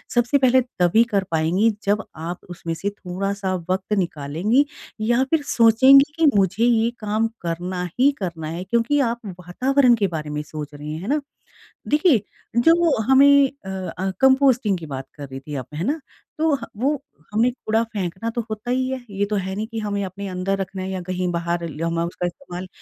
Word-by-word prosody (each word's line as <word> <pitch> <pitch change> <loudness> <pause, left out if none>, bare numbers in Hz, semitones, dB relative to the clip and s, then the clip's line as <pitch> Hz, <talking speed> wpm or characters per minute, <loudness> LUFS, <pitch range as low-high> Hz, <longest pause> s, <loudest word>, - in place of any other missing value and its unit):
सबसे 240 +4 +3
पहले 260 -1 +4 0.2
तभी 180 +6 +5
कर 200 -2 +2
पाएँगी 165 +7 +2
जब 205 +2 +1
आप 165 +3 -5
उसमें 170 -1 -5
से 180 +5 -2
थोड़ा-सा 195 0 -3 0.2
वक़्त 190 +3 -1
निकालेंगी 175 - +1 0.4
या 240 +4 +2
फ़िर 315 +3 +1
सोचेंगी 260 +4 +6
कि 325 - +3
मुझे 195 +3 +2
ये 230 -1 +3
काम 215 +1 0
करना 175 +2 -3 0.2
ही 280 +2 +6
करना 170 -5 -4
है 170 +3 -4
क्योंकि 235 +8 +1
आप 235 -2 0 0.2
वातावरण 250 +8 +3
के 205 -3 +1
बारे 155 -3 -5
में 150 0 -3
सोच 150 -1 -7
रही 150 +1 -7
हैं। 160 - -6
है 195 - -7
ना? 295 +2 +1 0.7
देखिए 295 - +4 0.4
जो 330 0 +4
हमें 265 +4 +6 0.4
अ - - -6
अ, 190 0 -3
कंपोस्टिंग 265 -6 +4
की 160 - -8
बात 135 -2 -6
कर 145 -2 -8
रही 135 0 -7
थी 145 +2 -8
आप। 130 -3 -4
है 165 +4 -3
ना? 300 +6 -1 0.4
तो 315 -1 +3 0.2
वो 270 +7 +1 0.4
हमने 230 +4 +3
कूड़ा 225 -2 -1
फेंकना 195 +2 -3
तो 235 - -2
होता 215 +3 -4
ही 255 +1 +1
है। 260 -1 -4
ये 200 +1 -1
तो 210 - +1
है 190 0 -2
नहीं 215 +2 -3
कि 225 0 -6
हमें 205 -2 -2
अपने 195 +2 -6
अंदर 190 +1 -2
रखना 190 0 -4
है 190 - -4
या 190 -1 -3
कहीं 185 0 -2
बाहर 170 0 -2
ल 155 +1 -7
हमें 165 0 0
उसका 175 +1 -3
इस्तेमाल 180 -1 -7
200 Hz, 195 wpm, -22 LUFS, 175-240 Hz, 0.7 s, सोचेंगी